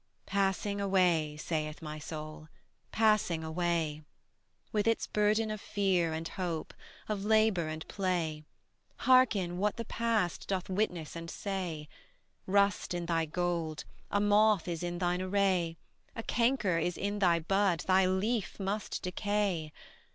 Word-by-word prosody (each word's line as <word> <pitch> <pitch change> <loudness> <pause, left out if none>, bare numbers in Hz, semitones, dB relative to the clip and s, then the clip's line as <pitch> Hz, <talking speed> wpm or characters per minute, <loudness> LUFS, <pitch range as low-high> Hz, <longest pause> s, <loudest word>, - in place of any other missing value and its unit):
Passing 200 +1 0
away, 175 -6 +2
saith 155 -1 -3
my 155 -1 -6
Soul, 155 0 -7 0.4
passing 210 -7 +2
away: 160 -2 -1 0.7
With 210 0 0
its 230 - +2
burden 215 +1 +1
of 215 -2 -5
fear 185 -5 +1
and 160 +1 -3
hope, 170 -4 -4 0.3
of 210 -2 -2
labor 215 -5 +3
and 155 0 -5
play; 170 -6 -1 0.6
Hearken 205 -9 +4
what 210 +1 0
the 230 - -4
past 225 -6 -1
doth 190 -1 -2
witness 180 -6 -1
and 165 0 -6
say: 175 -6 -4 0.6
Rust 200 -1 +2
in 175 -1 -3
thy 165 -1 +1
gold, 165 -1 -2 0.3
a 205 - +1
moth 205 -2 +4
is 170 -2 -3
in 175 0 -3
thine 180 0 0
array, 185 -3 +1 0.4
A 225 - -5
canker 230 -9 +1
is 175 +1 -1
in 205 +1 -2
thy 175 -4 +4
bud, 190 0 +1
thy 185 0 +4
leaf 200 +3 -1
must 200 +2 -3
decay. 185 -4 -1
185 Hz, 135 wpm, -31 LUFS, 165-205 Hz, 0.7 s, Hearken